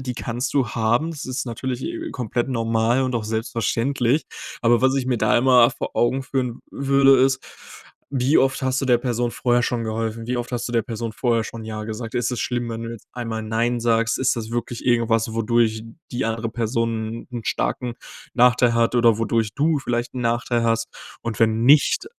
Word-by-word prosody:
die 125 -2 -4
kannst 120 +2 -3
du 135 -3 +2
haben. 120 +8 +1
Das 150 - -7
ist 130 +1 -3
natürlich, 125 +2 -4
äh, - - -4
komplett 120 +1 -2
normal 115 +1 +1
und 130 -1 -1
auch 115 - 0
selbstverständlich. 115 +5 0 0.4
Aber 120 0 +3
was 130 +1 +3
ich 130 -2 -1
mir 125 - +1
da 120 - +3
immer 125 -1 +5
vor 135 - -5
Augen 130 +3 +1
führen 125 -3 -2
würde, 135 -1 +4
ist, 130 -1 +3 0.7
wie 135 +2 +2
oft 135 0 +1
hast 130 0 0
du 135 - -2
der 125 -1 +5
Person 120 -1 -1
vorher 120 0 +1
schon 120 -2 -1
geholfen? 115 +1 -3
Wie 125 - -1
oft 120 0 -4
hast 120 0 -2
du 120 - -5
der 115 - +3
Person 115 -1 -5
vorher 115 -2 0
schon 115 0 -7
ja 110 -1 -5
gesagt? 110 +1 -6
Ist 120 0 0
es 125 - -3
schlimm, 120 -1 -2
wenn 115 0 -5
du 115 - -5
jetzt 115 -3 -10
einmal 115 -2 -4
nein 115 +2 0
sagst? 115 -1 +1
Ist 130 0 +2
das 110 -1 -5
wirklich 120 0 -4
irgendwas, 115 -2 +2
wodurch 115 -1 +1 0.3
die 125 +2 -1
andere 115 0 -2
Person 115 -1 -2
'n 120 -2 -6
starken 125 -2 -2 0.4
Nachteil 125 -1 +4
hat 115 +1 +2
oder 115 -3 +4
wodurch 115 -1 0
du 150 +1 +2
vielleicht 120 -2 -3
'n 125 - -3
Nachteil 120 0 0
hast? 115 0 +1 0.3
Und 115 -2 -4
wenn 115 0 +2
nicht, 150 - +4
120 Hz, 200 wpm, -22 LUFS, 115-125 Hz, 0.7 s, immer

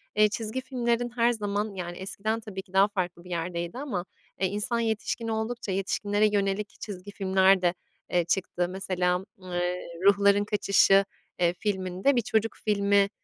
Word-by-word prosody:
eee, 210 0 +5
çizgi 220 +4 -3
filmlerin 240 -2 -1
her 235 0 +4
zaman, 205 -1 -2
yani, 175 -1 -5
eskiden 215 +4 -2
tabii 205 -4 -7
ki 190 -1 -25
daha 195 +1 +6
farklı 180 -4 -3
bir 180 - -13
yerdeydi 170 +2 -3
ama, 240 -11 -3 0.3
eee, 190 - +2
insan 210 +5 -1
yetişkin 225 0 -1
oldukça, 220 -1 -2
yetişkinlere 205 +2 +1
yönelik 200 0 0
çizgi 200 -1 -7
filmler 190 -1 +3
de, 175 -1 +2 0.4
eee, 175 -1 +2
çıktı. 175 0 0
Mesela, 185 -1 -1
eee, 180 -1 -3 0.2
Ruhların 200 0 +5
Kaçışı, 200 -1 +4 0.3
eee, 175 -1 +3
filminde, 190 +5 0
bir 240 - +3
çocuk 220 0 0
filmi, 200 -1 +3
200 Hz, 155 wpm, -27 LUFS, 185-215 Hz, 0.4 s, daha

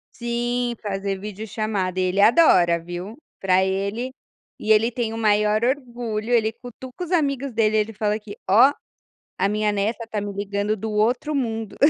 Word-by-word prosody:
Sim, 240 0 -1
fazer 195 -1 -3
videochamada 205 -2 -3
e - - +2
ele 185 +2 0
adora 185 - +5
viu, 175 +7 -7 0.2
para 190 0 +3
ele 200 +6 -2 0.5
e 220 - 0
ele 225 +3 +4
tem 230 -2 -2
o - - -5
maior 210 0 +2
orgulho, 240 -4 -2
ele 220 -2 +3
cutuca 245 +7 -9
os 345 - -10
amigos 275 -6 0
dele 220 -1 +2
ele 215 +1 0
fala 210 +1 -1
que: 205 -1 -10
"Ó, 250 +8 +6 0.6
a 195 +2 +1
minha 210 0 +1
neta 215 +3 -2
tá 210 -2 -3
me 205 0 -4
ligando 200 +1 -1
do 220 +1 -5
outro 240 +8 +1
mundo". 225 -6 -2
215 Hz, 165 wpm, -23 LUFS, 200-240 Hz, 0.6 s, Ó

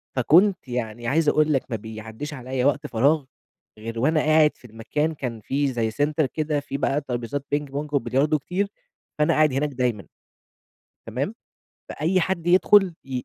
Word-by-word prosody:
فكنت 170 - +4
يعني 120 -1 -4
عايز 150 +2 +3
أقول 155 0 +3
لك 135 - +1
ما - - 0
بيعدّيش 110 +7 -8
عليَّ 130 0 -3
وقت 145 - +1
فراغ 140 +5 +2 0.5
غير 115 +1 -5
وأنا 155 +5 +2
قاعد 155 0 +4
في - - -20
المكان، 120 +9 -2
كان 120 -6 -5
فيه 140 +2 0
زي 115 -2 -1
سينتر 145 +4 +1
كده 150 +1 -1
فيه 140 -1 -5
بقى 140 +1 0
ترابيزات 130 +2 -4
Ping 145 -1 -3
Pong 145 +2 -4
وبلياردو 145 +2 +1
كتير، 185 +7 -2 0.5
فأنا 150 - +3
قاعد 155 -3 +3
هناك 145 +2 0
دايمًا، 125 -6 -2 1.0
تمام. 135 - -3 0.5
فأي 175 +4 0
حد 175 -1 -2
يدخل 185 0 +5
ي 130 -2 -4
140 Hz, 165 wpm, -24 LUFS, 125-155 Hz, 1.0 s, يدخل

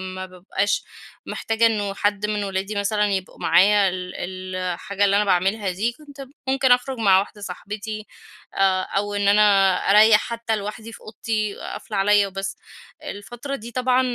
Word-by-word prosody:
ما 185 - -5
بابقاش 185 +2 -2 0.4
محتاجة 225 +1 0
إنّه 205 -3 +1
حد 205 0 0
من 210 -1 -1
أولادي 195 +1 -3
مثلًا 210 +1 +1
يبقوا 190 -2 -3
معايا 200 +1 +4
ال 180 0 -6 0.4
الحاجة 185 +3 -1
اللي 200 0 +3
أنا 210 - +3
باعملها 195 +1 +1
دي، 210 +6 -1
كنت 280 0 -12 0.2
ممكن 265 -1 +2
أخرج 250 +1 +2
مع 195 -4 +5
واحدة 205 +1 -6
صاحبتي 210 +3 -6 0.5
آآ، 190 -1 +2
أو 205 +1 -2
إن 205 0 0
أنا 200 -2 +5 0.2
أريّح 210 +1 +7
حتّى 230 -1 -3
لوحدي 215 +2 -6
في - - -12
أوضتي 215 -1 -3
قافله 210 - -6
عليَّ 200 +1 +4
وبس. 195 0 -5 0.5
الفترة 240 +7 -6
دي 235 0 -9
طبعًا 255 +1 +2
205 Hz, 155 wpm, -22 LUFS, 195-220 Hz, 0.5 s, أريّح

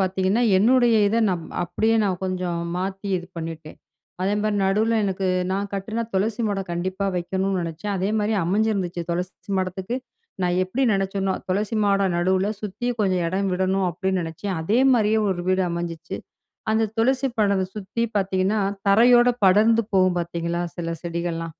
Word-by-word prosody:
பார்த்தீங்கன்னா, 190 +4 +1 0.2
என்னுடைய 240 +1 +4
இத 225 - 0
நான். 175 -3 -2 0.2
அப்படியே 220 +6 +1
நான் 185 -2 -1
கொஞ்சம் 180 -2 -2 0.2
மாத்தி 195 +2 -4
இது 175 - -9
பண்ணிட்டேன். 160 -1 -7 0.5
அதேமாரி 205 +2 0
நடுவுல 220 +4 +2
எனக்கு 190 -1 -1 0.3
நான் 200 +1 -2
கட்டினா 215 +4 -3
துளசி 215 +4 0
மாடம் 195 -3 -2
கண்டிப்பா 185 +3 -2
வெக்கணும்ன்னு 190 +2 -1
நினச்சேன். 170 +5 -4
அதே 190 +2 -1
மாரி 210 +1 0
அமைஞ்சிருந்துச்சு, 195 -2 0
துளசி 180 +3 -4
மாடத்துக்கு 190 +5 -2 0.5
நான் 180 0 +1
எப்படி 230 +9 -2
நினைச்சேனோ, 195 0 0
துளசி 205 +4 -1
மாடம் 195 -3 +2
நடுவுல 185 +3 +1
சுத்தி 210 +4 -4
கொஞ்சம் 185 -4 +1
இடம் 190 +3 -1
விடணும், 190 +1 +1
அப்படின்னு 190 +2 -1
நினைச்சேன். 175 +3 -4
அதே 210 +8 +2
மாரியே 220 -2 +3
ஒரு 175 -1 -2
வீடு 185 0 +2
அமைஞ்சிச்சு. 170 -1 -5 0.5
அந்த 220 -1 +1
துளசி 260 +3 +2
மாடத்த 200 -3 +2
சுத்தி 210 +3 -2
பார்த்தீங்கன்னா, 195 +2 0 0.3
தரையோட 240 +4 +6 0.2
படர்ந்து 220 +4 +4
போகும் 185 -2 +3
பார்த்தீங்களா? 170 0 -3 0.2
சில 165 -1 -2
செடிகள்லாம். 170 -1 -3
190 Hz, 145 wpm, -23 LUFS, 180-210 Hz, 0.5 s, தரையோட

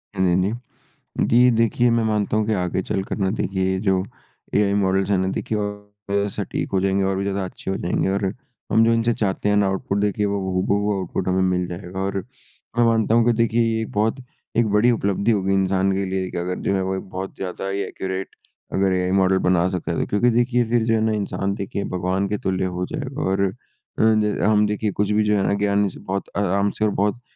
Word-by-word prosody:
हाँ 95 - +1
जी, - - +3 0.2
हाँ 120 +3 -5 0.6
जी। - - +2
जी 125 +2 +5
देखिए 115 +2 +3
मैं 115 0 +2
मानता 105 -1 0
हूँ 110 - +1
कि 110 - +2
आगे 90 -1 -1
चलकर 95 +1 -3
ना 95 -2 +1
देखिए 95 -1 0
जो 95 -2 +1 0.5
एआइ 100 -1 +3
मॉडल्ज़ 95 0 +1
है 100 - +3
ना 95 0 0
देखिए 110 - -2
और 105 0 -3
सटीक - - -3
हो 95 - +3
जाएँगे, 95 0 +1
और 95 0 0
भी 100 - -1
ज़्यादा 100 0 -1
अच्छे 95 - -6
हो - - -1
जाएँगे 90 +2 0
और, 95 0 0 0.4
हम 110 +2 +5
जो 115 - +4
इनसे 115 +1 +2
चाहते 105 -1 -1
हैं 105 - +3
ना 100 - +3
आउटपुट 95 +1 -1
देखिए 105 0 0
वो 100 0 -1
हूबहू 100 +3 +1
आउटपुट 95 0 -3
हमें 95 0 +2
मिल 90 -1 +1
जाएगा। 90 +1 -7
और 100 +1 -2 0.6
मैं 120 - +5
मानता 115 -1 +3
हूँ 115 -1 +4
कि 120 - +4
देखिए 115 0 +2
ये 115 -1 0
एक 110 - -5
बहुत 110 +2 +1 0.4
एक 115 -1 +3
बड़ी 105 +4 +4
उपलब्धि 100 -1 +1
होगी 95 -3 +1
इंसान 95 0 +2
के 95 0 -1
लिए 95 -1 -2
कि - - -5
अगर 90 +1 -2
जो - - +2
है 95 - +1
वो 95 +1 -1
एक 95 - -4
बहुत 95 +1 -6
ज़्यादा 95 +1 -5
ही 100 +1 -2
एक्युरेट 95 0 -5 0.4
अगर 95 -1 +2
एआइ 90 0 0
मॉडल 95 0 +3
बना 90 -1 +2
सकता 90 -2 -3
है। 85 - -2
तो - - 0
क्योंकि 110 +4 +2
देखिए 120 +1 +2
फ़िर 120 -1 +2
जो 115 - +2
है 110 - +2
ना 110 - +1
इंसान 100 -2 -1
देखिए 100 -1 -4
भगवान 95 +2 0
के 105 - -1
तुल्य 95 0 0
हो 90 0 -2
जाएगा 140 -2 -4
और 95 +1 0
अ 95 - -1 0.5
ज, 110 -1 +3
हम 105 0 +4
देखिए 105 0 -1
कुछ 105 +1 -1
भी 105 +1 +3
जो 105 0 +2
है 100 - +1
ना - - +2
ज्ञान 100 0 +2
इससे 100 - -5
बहुत 95 +1 -4
आराम 100 0 +1
से 110 - +3
और 105 - +2
बहुत 105 +4 0
100 Hz, 235 wpm, -22 LUFS, 95-110 Hz, 0.6 s, जी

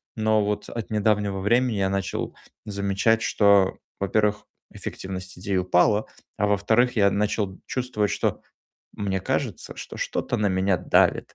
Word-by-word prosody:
но 110 -1 +2
вот 105 0 -2
от 115 -2 -5
недавнего 105 -2 +1
времени 120 +4 +2
я 95 -1 +1
начал 95 -2 -3 0.3
замечать, 100 +2 +1
что, 100 -2 +4 0.2
во-первых, 105 +2 +1 0.3
эффективность 95 -1 -7
идей 95 0 -1
упала, 90 +4 +2 0.3
а, 105 - +1
во-вторых, 110 +5 +2
я 100 -2 +4
начал 100 -2 -1
чувствовать, 125 -5 -1
что - - -1 0.5
мне 95 -2 -2
кажется, - - -3
что - - -9
что-то - - -2
на 105 -1 +1
меня 95 0 +1
давит. 90 - +2
100 Hz, 140 wpm, -25 LUFS, 95-110 Hz, 0.5 s, что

